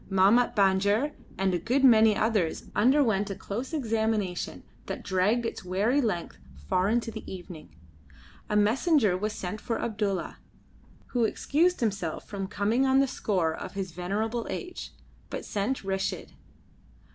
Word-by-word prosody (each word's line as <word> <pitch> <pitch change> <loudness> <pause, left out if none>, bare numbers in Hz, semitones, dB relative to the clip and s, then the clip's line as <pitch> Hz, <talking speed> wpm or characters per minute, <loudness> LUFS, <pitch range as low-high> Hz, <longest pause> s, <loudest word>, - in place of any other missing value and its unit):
Mahmat 200 +6 +4
Banjer 200 +7 +3 0.3
and 190 -1 +1
a 175 - +1
good 255 +10 0
many 220 -4 +7
others 210 -7 0
underwent 220 -4 +3
a 195 - -3
close 230 - -5
examination 220 - -1 0.2
that - - -5
dragged 205 +6 +1
its 230 - -4
weary 205 +10 +1
length 180 -9 -2 0.3
far 185 +2 +2
into 230 0 0
the 220 - -7
evening. 175 - -10 0.7
A 210 - 0
messenger 220 - +3
was 210 +4 -2
sent 205 0 -5
for 230 - -2
Abdulla, 205 -4 -2 0.7
who 245 -2 +1
excused 335 +10 +1
himself 200 -8 -2
from 195 -2 -4
coming 215 +7 +1
on 265 0 +4
the 275 - +4
score 180 -10 0
of - - -7
his 195 -2 -4
venerable 210 +7 -2
age, 360 -2 -6 0.4
but - - -5
sent 215 +6 -2
Reshid. 195 0 -2
210 Hz, 145 wpm, -28 LUFS, 190-235 Hz, 0.7 s, many